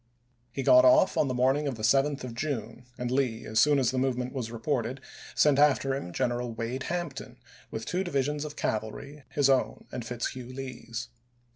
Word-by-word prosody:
He 135 Hz, -, -3 dB
got 315 Hz, -, +7 dB
off 315 Hz, -1 st, +5 dB
on 145 Hz, -, +2 dB
the 130 Hz, -, -1 dB
morning 135 Hz, +4 st, +2 dB
of 135 Hz, -, -2 dB
the 110 Hz, -, -8 dB
7th 135 Hz, +4 st, +2 dB
of 125 Hz, -2 st, -6 dB
June, 120 Hz, -3 st, -4 dB
and 125 Hz, 0 st, -3 dB
Lee, 125 Hz, -3 st, 0 dB
as 110 Hz, 0 st, 0 dB
soon 145 Hz, +4 st, +5 dB
as 130 Hz, -3 st, +2 dB
the 130 Hz, -, -1 dB
movement 125 Hz, -1 st, -1 dB
was 125 Hz, -5 st, -3 dB
reported, 120 Hz, +1 st, -2 dB, 0.4 s
sent 145 Hz, -2 st, +4 dB
after 140 Hz, -2 st, +4 dB
him 135 Hz, -10 st, -4 dB
General 120 Hz, +5 st, -1 dB
Wade 115 Hz, +3 st, -4 dB
Hampton 175 Hz, -5 st, -4 dB, 0.3 s
with 110 Hz, 0 st, -5 dB
two 180 Hz, +8 st, -1 dB
divisions 145 Hz, -3 st, -1 dB
of 150 Hz, -1 st, -6 dB
cavalry, 110 Hz, +7 st, -4 dB
his 145 Hz, -2 st, +2 dB
own 135 Hz, -2 st, +1 dB
and 125 Hz, -, -5 dB
Fitzhugh 125 Hz, +1 st, -5 dB
Lee's. 120 Hz, -2 st, -6 dB
130 Hz, 185 wpm, -28 LUFS, 120-145 Hz, 0.4 s, got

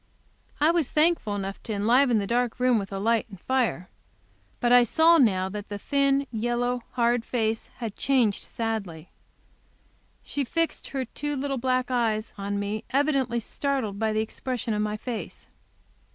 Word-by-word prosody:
I 305 Hz, +2 st, +5 dB
was 335 Hz, -5 st, +1 dB
thankful 305 Hz, -9 st, +2 dB
enough 195 Hz, 0 st, -5 dB
to 220 Hz, -, -4 dB
enliven 235 Hz, +4 st, +3 dB
the 205 Hz, -, 0 dB
dark 240 Hz, +2 st, 0 dB
room 250 Hz, -2 st, +3 dB
with 195 Hz, 0 st, -6 dB
light 220 Hz, +4 st, 0 dB
and 195 Hz, -3 st, -11 dB
fire. 240 Hz, -7 st, 0 dB, 0.7 s
But 240 Hz, -, +1 dB
I 245 Hz, 0 st, +8 dB
saw 325 Hz, +7 st, +5 dB
now 190 Hz, -7 st, +3 dB
that 205 Hz, 0 st, -7 dB
the 205 Hz, -, -4 dB
thin, 275 Hz, +4 st, +1 dB
yellow, 240 Hz, +2 st, -1 dB
hard 240 Hz, -1 st, +2 dB
face 225 Hz, -2 st, -1 dB
had 225 Hz, -4 st, -5 dB
changed 250 Hz, -7 st, +2 dB
sadly. 200 Hz, -8 st, -4 dB, 1.1 s
She 285 Hz, -, -2 dB
fixed 330 Hz, +5 st, -2 dB
her 270 Hz, -2 st, -3 dB
two 295 Hz, +5 st, -4 dB
little 275 Hz, -1 st, -2 dB
black 255 Hz, +1 st, 0 dB
eyes 225 Hz, -3 st, 0 dB
on 200 Hz, 0 st, -3 dB
me, 205 Hz, +2 st, -3 dB
evidently 270 Hz, -4 st, +1 dB
startled 235 Hz, -4 st, -2 dB
by 220 Hz, -1 st, +1 dB
the 215 Hz, 0 st, +1 dB
expression 235 Hz, +1 st, -3 dB
of 210 Hz, -, 0 dB
my 210 Hz, 0 st, -1 dB
face. 235 Hz, +1 st, -6 dB
235 Hz, 160 wpm, -26 LUFS, 210-265 Hz, 1.1 s, I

